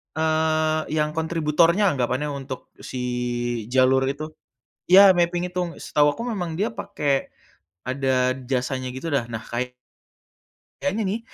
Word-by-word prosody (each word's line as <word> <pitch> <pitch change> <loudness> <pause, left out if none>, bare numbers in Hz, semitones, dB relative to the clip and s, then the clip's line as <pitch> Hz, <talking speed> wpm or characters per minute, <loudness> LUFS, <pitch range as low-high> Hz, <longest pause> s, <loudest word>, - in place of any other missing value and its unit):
eee, 155 0 +1
yang 150 -1 +1
kontributornya 165 +4 +2
anggapannya 130 +2 -1
untuk 135 -2 -7
si 130 - -6 0.7
jalur 130 0 +4
itu. 150 +3 -4 0.6
Ya 195 +1 +9
mapping 175 0 0
itu, 180 -2 -3
setahu 145 -1 +2
aku 230 - -5
memang 175 -5 -3
dia 205 +4 0
pakai, 145 -11 -1 0.6
ada 130 -1 +1 0.2
jasanya 130 0 -1
gitu 160 +5 -4
dah. 130 -4 0
Nah, 115 -2 -6
kay 125 +1 -4 1.1
kayaknya 205 +3 0
nih, 220 - -2
150 Hz, 125 wpm, -23 LUFS, 130-170 Hz, 1.1 s, Ya